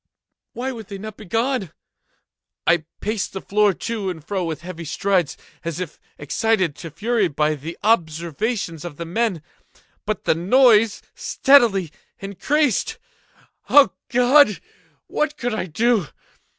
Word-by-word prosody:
Why 255 Hz, +2 st, -3 dB
would 225 Hz, -5 st, -9 dB
they 200 Hz, -, -7 dB
not 215 Hz, +1 st, -8 dB
be 215 Hz, -, -11 dB
gone? 225 Hz, -, -1 dB, 0.9 s
I 170 Hz, -2 st, +3 dB, 0.2 s
paced 215 Hz, -1 st, -2 dB
the 190 Hz, -, -4 dB
floor 210 Hz, 0 st, +3 dB
to 205 Hz, +1 st, -4 dB
and 160 Hz, -4 st, -7 dB
fro 195 Hz, -3 st, -1 dB
with 160 Hz, -2 st, -4 dB
heavy 170 Hz, -1 st, -7 dB
strides, 180 Hz, 0 st, 0 dB, 0.3 s
as 170 Hz, 0 st, -4 dB
if 180 Hz, -4 st, -6 dB, 0.2 s
excited 185 Hz, +2 st, 0 dB
to 165 Hz, -, -7 dB
fury 210 Hz, +5 st, 0 dB
by 150 Hz, 0 st, 0 dB
the 155 Hz, +3 st, -7 dB
observations 170 Hz, -, 0 dB
of 170 Hz, -5 st, -8 dB
the 170 Hz, -, -5 dB
men—but 210 Hz, +2 st, -5 dB
the -, -, +3 dB
noise 220 Hz, +4 st, +4 dB
steadily 225 Hz, -, +3 dB, 0.3 s
increased. 245 Hz, -, 0 dB, 0.7 s
Oh 285 Hz, -1 st, +7 dB, 0.2 s
God! 250 Hz, -2 st, +5 dB, 0.5 s
what 300 Hz, 0 st, -2 dB
could 245 Hz, -4 st, -2 dB
I 220 Hz, -, -2 dB
do? 215 Hz, +1 st, +1 dB
200 Hz, 135 wpm, -22 LUFS, 170-230 Hz, 0.9 s, Oh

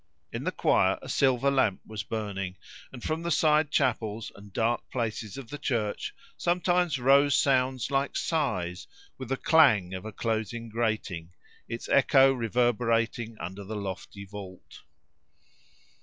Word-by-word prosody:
In -, -, -4 dB
the -, -, +1 dB
choir -, -, +2 dB
a -, -, -8 dB
silver 135 Hz, 0 st, +2 dB
lamp 130 Hz, -8 st, +2 dB
was 110 Hz, -2 st, -5 dB
burning, 100 Hz, -4 st, -4 dB, 0.4 s
and 125 Hz, -3 st, -10 dB
from 160 Hz, +1 st, -2 dB
the 170 Hz, -, -3 dB
side 155 Hz, -1 st, +3 dB
chapels 115 Hz, -7 st, 0 dB
and 100 Hz, 0 st, -13 dB
dark 115 Hz, +4 st, 0 dB
places 115 Hz, -2 st, -3 dB
of 130 Hz, -4 st, -9 dB
the 145 Hz, -, -6 dB
church 115 Hz, -7 st, -2 dB, 0.2 s
sometimes 175 Hz, -2 st, +1 dB
rose 140 Hz, +2 st, +5 dB
sounds 130 Hz, -4 st, +1 dB
like 135 Hz, 0 st, 0 dB
sighs, 90 Hz, -, -1 dB, 0.3 s
with 130 Hz, -2 st, -6 dB
the 135 Hz, -, 0 dB
clang 115 Hz, -, +4 dB
of 95 Hz, -, -5 dB
a 110 Hz, -, -6 dB
closing 115 Hz, +1 st, -3 dB
grating, 105 Hz, -7 st, -2 dB, 0.4 s
its 115 Hz, 0 st, -5 dB
echo 135 Hz, -1 st, +5 dB
reverberating 115 Hz, -1 st, 0 dB
under 95 Hz, +4 st, -6 dB
the 110 Hz, +3 st, -6 dB
lofty 100 Hz, 0 st, -6 dB
vault. 95 Hz, -2 st, -11 dB
115 Hz, 140 wpm, -28 LUFS, 105-135 Hz, 0.4 s, rose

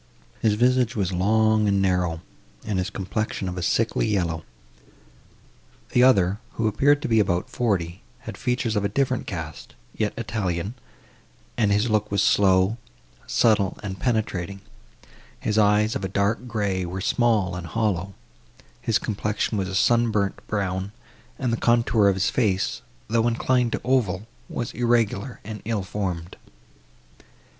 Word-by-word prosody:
His 110 Hz, -2 st, +3 dB
visage 125 Hz, +1 st, +2 dB
was 95 Hz, -4 st, -1 dB
long 110 Hz, +3 st, +3 dB
and 100 Hz, -1 st, +2 dB
narrow, 90 Hz, -4 st, +1 dB, 0.4 s
and 105 Hz, -3 st, -1 dB
his 90 Hz, -, -1 dB
complexion 95 Hz, 0 st, -3 dB
of 90 Hz, -, -4 dB
a 90 Hz, -, -4 dB
sickly 110 Hz, +6 st, +1 dB
yellow. 85 Hz, -6 st, -1 dB, 1.5 s
The 125 Hz, -, +4 dB
other, 100 Hz, -6 st, +4 dB
who 115 Hz, -, 0 dB
appeared 145 Hz, +8 st, +3 dB
to -, -, -1 dB
be 115 Hz, -2 st, +3 dB
about 90 Hz, -4 st, 0 dB
forty, 95 Hz, -7 st, -1 dB, 0.2 s
had -, -, -7 dB
features 125 Hz, -2 st, -1 dB
of 105 Hz, -, +1 dB
a 100 Hz, -, +1 dB
different 130 Hz, +2 st, 0 dB
cast, 85 Hz, -5 st, -7 dB, 0.2 s
yet -, -, -1 dB
Italian, 95 Hz, -1 st, -2 dB, 0.8 s
and 105 Hz, -3 st, +2 dB
his 105 Hz, +3 st, +2 dB
look 105 Hz, -1 st, +1 dB
was 100 Hz, -1 st, +2 dB
slow, 95 Hz, +2 st, +3 dB, 0.5 s
subtle 105 Hz, -4 st, +2 dB
and 95 Hz, -2 st, -5 dB
penetrating; 100 Hz, -5 st, -1 dB, 0.8 s
his 105 Hz, 0 st, 0 dB
eyes, 105 Hz, +1 st, +3 dB
of -, -, -3 dB
a -, -, 0 dB
dark 100 Hz, +5 st, 0 dB
grey, 100 Hz, -5 st, -1 dB
were 90 Hz, +2 st, -4 dB
small, 105 Hz, -3 st, +1 dB
and 90 Hz, -1 st, -6 dB
hollow; 100 Hz, -3 st, -1 dB, 0.7 s
his -, -, +2 dB
complexion 105 Hz, +1 st, -2 dB
was 95 Hz, -2 st, -1 dB
a 95 Hz, -, -4 dB
sun 120 Hz, +3 st, +3 dB
burnt 100 Hz, -3 st, -1 dB
brown, 95 Hz, -1 st, -2 dB, 0.4 s
and 125 Hz, -3 st, -1 dB
the -, -, 0 dB
contour 115 Hz, -3 st, +3 dB
of 100 Hz, -, +3 dB
his 95 Hz, +1 st, +1 dB
face, 100 Hz, -6 st, 0 dB, 0.3 s
though 115 Hz, +1 st, +2 dB
inclined 120 Hz, 0 st, +1 dB
to -, -, -2 dB
oval, 110 Hz, -6 st, +1 dB, 0.2 s
was 120 Hz, -, -3 dB
irregular 120 Hz, -1 st, 0 dB
and 105 Hz, 0 st, -7 dB
ill 110 Hz, -3 st, -1 dB
formed. 90 Hz, -3 st, -4 dB
105 Hz, 150 wpm, -24 LUFS, 95-115 Hz, 1.5 s, The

